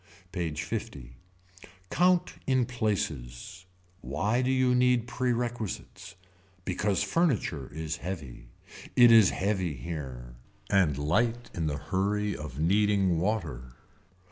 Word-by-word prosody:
PAGE 80 Hz, -4 st, -3 dB
L. -, -, +2 dB, 1.1 s
Count 180 Hz, +2 st, +3 dB
in 130 Hz, -2 st, +3 dB
places. 90 Hz, -, -3 dB, 0.4 s
Why 105 Hz, +7 st, 0 dB
do 130 Hz, -, 0 dB
you 130 Hz, -1 st, +3 dB
need 125 Hz, -1 st, +3 dB
perquisites. 120 Hz, -4 st, -3 dB, 0.5 s
Because 95 Hz, +1 st, 0 dB
furniture 110 Hz, -, 0 dB
is 80 Hz, 0 st, -4 dB
heavy. 75 Hz, -10 st, -7 dB, 0.5 s
It 120 Hz, -1 st, +8 dB
is 110 Hz, -4 st, +8 dB
heavy 95 Hz, -5 st, -1 dB
here. 65 Hz, -4 st, -7 dB, 0.3 s
And 85 Hz, -8 st, +3 dB
light 115 Hz, +11 st, 0 dB
in 80 Hz, -2 st, -2 dB
the 75 Hz, -2 st, -2 dB
hurry 105 Hz, +4 st, -1 dB
of 75 Hz, -4 st, -7 dB
needing 95 Hz, 0 st, +3 dB
water. 80 Hz, -, -2 dB
95 Hz, 110 wpm, -29 LUFS, 75-120 Hz, 1.1 s, It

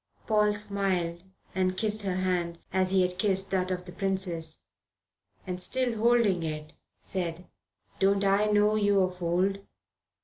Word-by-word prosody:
Paul 210 Hz, -1 st, +3 dB
smiled 195 Hz, -5 st, -1 dB, 0.3 s
and 185 Hz, 0 st, 0 dB
kissed 215 Hz, +1 st, +1 dB
her 190 Hz, -2 st, -1 dB
hand 180 Hz, -2 st, -1 dB, 0.2 s
as 185 Hz, 0 st, +2 dB
he 190 Hz, -1 st, +3 dB
had 180 Hz, 0 st, -2 dB
kissed 195 Hz, -1 st, 0 dB
that 185 Hz, -1 st, 0 dB
of 180 Hz, -1 st, -3 dB
the 180 Hz, -, -8 dB
princess, 180 Hz, -4 st, -1 dB, 0.8 s
and, 180 Hz, -1 st, -4 dB
still 255 Hz, +3 st, 0 dB
holding 230 Hz, -6 st, +3 dB
it, 155 Hz, -1 st, -5 dB, 0.3 s
said: 175 Hz, -1 st, -4 dB, 0.5 s
"Don't 195 Hz, +1 st, +3 dB
I 200 Hz, +2 st, +3 dB
know 210 Hz, 0 st, +3 dB
you 205 Hz, -2 st, +3 dB
of 185 Hz, -1 st, -2 dB
old? 180 Hz, +3 st, +1 dB
190 Hz, 145 wpm, -28 LUFS, 180-205 Hz, 0.8 s, Paul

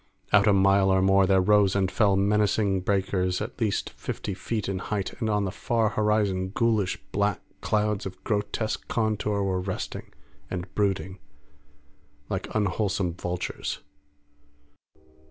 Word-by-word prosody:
Out 100 Hz, +1 st, +6 dB
a -, -, +6 dB
mile 95 Hz, 0 st, +4 dB
or 95 Hz, 0 st, +4 dB
more 95 Hz, 0 st, +4 dB
there 95 Hz, 0 st, +4 dB
rose 100 Hz, 0 st, +4 dB
and 95 Hz, -1 st, +1 dB
fell 100 Hz, +1 st, +3 dB
menacing 100 Hz, -1 st, +2 dB
breakers 95 Hz, -1 st, 0 dB
at -, -, -6 dB
least 105 Hz, -3 st, 0 dB
fifty 100 Hz, -, -5 dB
feet 105 Hz, +3 st, -3 dB
in 95 Hz, -1 st, -2 dB
height, 100 Hz, -1 st, -3 dB
and 110 Hz, -3 st, -1 dB
on 105 Hz, -1 st, +1 dB
the 95 Hz, -, -2 dB
far 115 Hz, +2 st, 0 dB
horizon 105 Hz, -3 st, +1 dB
ghoulish 110 Hz, -5 st, +1 dB
black 100 Hz, -2 st, +1 dB, 0.2 s
clouds 105 Hz, -1 st, 0 dB
of 95 Hz, 0 st, -11 dB
grotesque 105 Hz, +1 st, -2 dB
contour 105 Hz, -2 st, 0 dB
were 95 Hz, -1 st, 0 dB
resting 95 Hz, 0 st, -5 dB, 0.4 s
and 90 Hz, 0 st, -5 dB
brooding 95 Hz, -2 st, -1 dB, 1.1 s
like -, -, -3 dB
unwholesome 100 Hz, -3 st, 0 dB
vultures. 90 Hz, +1 st, -4 dB
100 Hz, 135 wpm, -26 LUFS, 95-105 Hz, 1.1 s, Out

